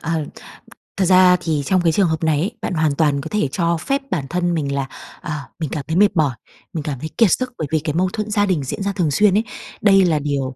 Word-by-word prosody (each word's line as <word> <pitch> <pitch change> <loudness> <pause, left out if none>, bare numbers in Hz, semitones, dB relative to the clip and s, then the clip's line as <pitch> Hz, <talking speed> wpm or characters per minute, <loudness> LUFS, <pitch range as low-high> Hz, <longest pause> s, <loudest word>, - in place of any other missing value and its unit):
Ờ, 160 -2 -2 0.7
thật 190 - +2
ra 185 0 +6
thì 155 -4 -1
trong 185 +2 +2
cái 165 -2 +3
trường 190 +3 +2
hợp 160 0 -2
này 155 -2 +2
ấy, 190 +7 -1
bạn - - -3
hoàn 155 -3 +1
toàn 145 -3 +1
có 160 - -6
thể 210 -9 +1
cho 170 +1 0
phép 275 - -1
bản 160 -7 -1
thân 175 0 0
mình 140 -4 -2
là, 135 -1 -2 0.3
ờ, 170 - -6 0.3
mình 155 - -3
cảm 145 -4 -4
thấy 160 - -2
mệt 205 -1 +4
mỏi, 145 -6 +1 0.4
mình 155 -3 -3
cảm 140 -5 -4
thấy 155 - -5
kiệt 225 -5 +5
sức, 255 -1 -4
bởi 155 - -3
vì 160 - +2
cái 150 0 -3
mâu 185 +1 +2
thuẫn 215 0 -3
gia 205 -1 +2
đình 180 -7 0
diễn 195 +9 -4
ra 200 - 0
thường 165 -7 0
xuyên 205 +5 +3
ấy, 220 - +2 0.4
đây 195 -2 +5
là 160 -3 +2
điều 140 -3 -2
165 Hz, 265 wpm, -20 LUFS, 150-190 Hz, 0.7 s, ra